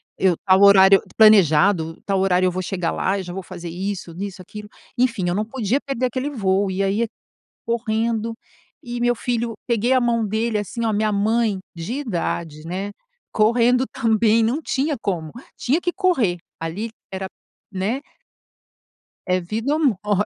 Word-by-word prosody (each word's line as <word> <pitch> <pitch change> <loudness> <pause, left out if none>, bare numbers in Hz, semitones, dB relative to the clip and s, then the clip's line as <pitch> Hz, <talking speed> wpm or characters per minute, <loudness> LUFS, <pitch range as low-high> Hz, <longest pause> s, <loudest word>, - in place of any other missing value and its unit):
eu, 185 -2 +2
tal 190 0 +5
horário 195 -1 +7 0.2
planejado, 180 -5 +5
tal 195 -1 0
horário 185 -1 +2
eu 185 - +2
vou 185 +1 -3
chegar 180 -2 -2
lá 195 +1 0
eu 195 - -4
já 175 -1 -7
vou 190 - -4
fazer 175 -2 -8
isso 185 0 -5
nisso 195 +2 -6
aquilo. 210 +3 -10 0.3
Enfim 235 -7 +1
eu - - 0
não 210 - 0
podia 235 +1 -1
perder 270 -3 -2
aquele 255 +3 -2
voo 200 -6 0
e 190 +1 -1
aí, 205 +4 +1 0.6
correndo 230 -1 -1 0.5
e 240 -2 -5
meu 240 0 +2
filho, 235 -1 -2
peguei 235 0 +1
a 260 - +5
mão 235 -2 +1
dele 220 +2 -1
assim, 230 +3 -4
olha, 220 - +1
minha 215 +1 +1
mãe 215 +1 +1 0.2
de 165 +7 -5
idade, 170 - -3
né, 190 +4 -4 0.4
correndo 240 +4 +3
também, 225 0 +2
não 245 +8 0
tinha 290 0 -1
como. 165 -6 -3 0.3
Tinha 290 +8 0
que 355 - 0
correr. 265 - +1 0.2
Ali 170 +8 -4 0.2
era, 190 0 -4 0.5
né? 205 +7 -1 1.3
é 185 -1 +1
vida 225 - -2
ou 315 - -1
morte. 210 - +1
210 Hz, 165 wpm, -21 LUFS, 190-235 Hz, 1.3 s, horário